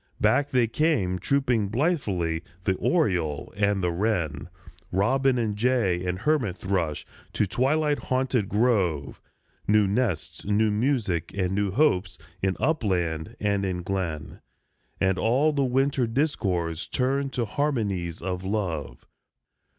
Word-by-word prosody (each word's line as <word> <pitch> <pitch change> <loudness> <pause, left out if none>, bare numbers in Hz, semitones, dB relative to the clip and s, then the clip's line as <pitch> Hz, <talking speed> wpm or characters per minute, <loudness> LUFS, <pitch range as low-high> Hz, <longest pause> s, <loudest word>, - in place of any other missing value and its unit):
Back 130 +7 +3
they 125 -2 +3
came 115 - +1
trooping 125 -2 +1
blithely, 100 - 0 0.2
the 95 - +2
oriole 90 - 0
and 100 -1 +1
the 90 - +1
wren, 85 -6 -1 0.4
Robin 130 +7 +2
and 110 -3 -1
jay 105 -6 +1
and 90 0 -2
hermit 120 - 0
thrush, 90 -6 -2 0.3
to - - +2
twilight 145 +8 +1
haunted 130 -5 0
grove; 100 - +1 0.5
New 105 0 +4
nests, 95 -6 -1
new 105 +1 +2
music, 105 - 0
and 95 -2 0
new 100 +1 0
hopes, 95 - +1 0.2
in 95 -1 0
upland 90 - 0
and 100 -1 0
in 90 -2 -2
glen, 90 -5 -4 0.6
And 95 -1 +1
all 135 +7 +3
the 140 -1 +1
winter 135 0 +1
discords 95 - -1
turned 135 +2 0
to 120 - 0
harmonies 105 - -2
of 90 -1 -3
love. 85 - -3
105 Hz, 125 wpm, -26 LUFS, 90-130 Hz, 0.6 s, New